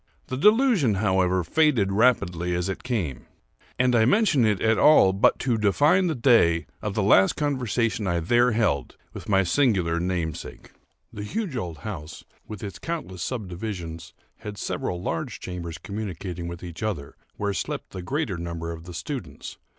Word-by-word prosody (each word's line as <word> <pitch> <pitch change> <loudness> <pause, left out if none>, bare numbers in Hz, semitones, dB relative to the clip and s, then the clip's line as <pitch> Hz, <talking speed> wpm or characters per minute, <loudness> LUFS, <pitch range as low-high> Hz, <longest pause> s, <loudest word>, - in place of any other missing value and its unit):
The 130 - -2
delusion, 210 - +4
however, 95 -2 +1
faded 120 - +2
rapidly 90 -6 +2
as 90 +2 -1
it 95 - -4
came; 90 - -3 0.5
and 125 -1 +3
I 110 - +5
mention 145 - +3
it 105 -3 +1
at 110 -1 +2
all 125 -11 +6
but 95 - +3
to 120 -4 0
define 145 - +3
the 160 - -1
day 110 - +4 0.2
of 105 -1 -3
the 105 - +1
last 95 -1 +5
conversation 120 -7 -1
I 85 -1 +1
there 120 +8 +3
held 70 - 0 0.2
with - - -9
my 95 -1 +4
singular 90 -6 +2
namesake. 85 -3 -4 0.4
The 105 - -6
huge 185 - -3
old 85 -9 -4
house, 85 -7 -7 0.2
with 105 -2 -8
its 100 -3 -6
countless 155 - -5
subdivisions, 90 -7 -5 0.2
had 105 -2 -8
several 90 -2 -3
large 85 -2 -4
chambers 85 -2 -6
communicating 95 -4 -5
with 85 +1 -7
each 85 +1 -8
other, 95 -11 -3 0.2
where 100 -1 -1
slept 95 - -4
the 95 - -6
greater 125 - -2
number 85 -1 -5
of 80 0 -9
the 90 -1 -9
students. 95 - -6
100 Hz, 165 wpm, -25 LUFS, 85-125 Hz, 0.5 s, all